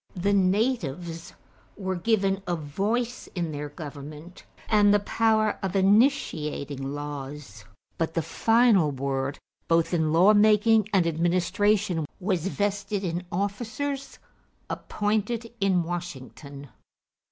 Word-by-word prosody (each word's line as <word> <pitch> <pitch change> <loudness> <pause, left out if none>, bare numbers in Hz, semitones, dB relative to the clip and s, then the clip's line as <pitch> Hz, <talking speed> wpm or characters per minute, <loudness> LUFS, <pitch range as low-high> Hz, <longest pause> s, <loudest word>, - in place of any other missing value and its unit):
The 200 +3 +1
natives 185 - 0 0.4
were 190 -2 -2
given 195 0 +1
a 175 - 0
voice 210 - -2
in 170 -3 -2
their 145 0 -5
government 150 +2 -10 0.2
and 210 -2 +4
the 205 - +5
power 215 +1 +1
of 195 0 -3
initiating 155 - +1
laws; 145 -7 -7 0.3
but 165 0 -1
the 165 - +1
final 225 -7 +3
word 135 0 -2 0.3
both 165 +1 +2
in 160 -2 +1
law 180 +6 +6
making 215 0 +4
and 190 -4 +3
administration 175 +2 +1
was 185 -3 -1
vested 200 0 -2
in 175 0 -3
officers 225 +9 -3 0.5
appointed 215 +2 -2
in 190 -3 +2
Washington. 145 -5 -7
185 Hz, 110 wpm, -26 LUFS, 155-210 Hz, 0.5 s, law